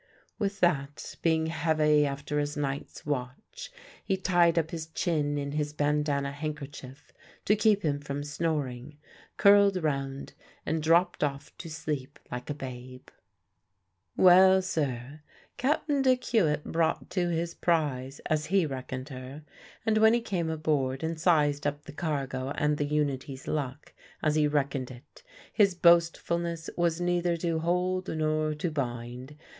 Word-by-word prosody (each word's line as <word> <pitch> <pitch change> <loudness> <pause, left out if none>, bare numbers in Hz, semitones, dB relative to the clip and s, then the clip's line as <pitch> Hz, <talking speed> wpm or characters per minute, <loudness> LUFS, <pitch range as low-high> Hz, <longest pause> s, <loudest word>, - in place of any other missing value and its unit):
With 200 -2 -2
that, 145 -5 0
being 160 -1 +2
heavy 155 -2 +2
after 140 +1 -3
his 145 0 -2
night's 140 -1 -4
watch, 140 - -5 0.3
he 195 - 0
tied 175 -3 +3
up 160 -1 +1
his 160 -2 -5
chin 155 -3 -1
in 140 0 -3
his 150 0 -2
bandanna 145 -1 0
handkerchief 145 -2 -7 0.3
to 210 - +4
keep 210 -1 +3
him 145 -3 0
from 145 0 -5
snoring, 145 -3 -3 0.4
curled 200 -1 +6
round, 135 -2 -2 0.3
and 160 +1 -1
dropped 170 +3 +3
off 140 0 -3
to 170 - -7
sleep 145 -3 -4
like 125 +3 -6
a 145 - -2
babe. 130 -2 -9 1.1
Well, 185 +1 +7
sir, 145 -5 -3 0.4
Cap'n 285 +1 +1
Dick 255 -1 +3
Hewitt 155 -10 +1
brought 165 -1 -1
to 175 -2 0
his 170 0 -2
prize, 145 -7 -1
as 155 -1 0
he 190 -1 +3
reckoned 130 -1 -5
her; 130 +3 -8 0.4
and 220 -1 +3
when 220 +1 +6
he 240 - 0
came 180 -7 -2
aboard 150 -4 -1
and 160 0 -2
sized 145 -4 +3
up 145 0 -3
the - - -11
cargo 135 -5 -3
and 150 0 +1
the 145 - 0
Unity's 140 -2 -2
luck, 145 -2 -4 0.3
as 155 - +3
he 150 -1 +3
reckoned 140 -3 -1
it, 130 +3 -14 0.3
his 200 -4 +4
boastfulness 170 -1 +2
was 170 -1 +1
neither 175 -1 +1
to 165 -1 -1
hold 180 +2 0
nor 155 -1 0
to 165 +2 -2
bind. 125 0 -5
150 Hz, 145 wpm, -28 LUFS, 140-170 Hz, 1.1 s, Well